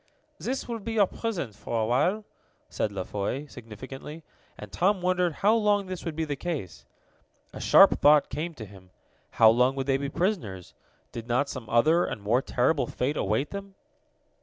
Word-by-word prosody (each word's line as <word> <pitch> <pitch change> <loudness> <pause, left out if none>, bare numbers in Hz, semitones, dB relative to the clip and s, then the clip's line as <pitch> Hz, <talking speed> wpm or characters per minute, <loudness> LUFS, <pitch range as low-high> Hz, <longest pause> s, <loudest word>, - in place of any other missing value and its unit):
"This 265 +2 -3
will 235 -2 -4
be 225 +2 -5
your 210 -3 +4
prison 185 - -4
for 115 +2 -4
a 110 - +1
while," 165 - +1 0.4
said 105 - -2
La 95 -2 -4
Foy 105 +10 -3
significantly, 135 +5 -10 0.3
and - - -10
Tom 190 +3 +1
wondered 180 -1 +1
how 215 - +6
long 210 -3 +2
this 185 -1 -6
would 165 -3 -4
be 160 0 -1
the 145 -2 -3
case. 135 - -5 0.7
A - - -8
sharp - - +6
thought 150 0 +5
came 165 +2 -4
to 110 - -8
him 95 -2 -16 0.5
how 110 -1 +8
long 125 +3 +2
would 135 -1 -3
they 135 -1 +2
be 140 0 -4
prisoners? 110 - -3 0.4
Did 115 0 -7
not 130 +4 +1
some 120 -5 -7
other, 155 +9 +4
and - - -4
more 110 +5 +1
terrible, 135 +4 0
fate 135 +4 -2
await 110 +7 -1
them? 200 -1 -8
140 Hz, 185 wpm, -27 LUFS, 115-180 Hz, 0.7 s, how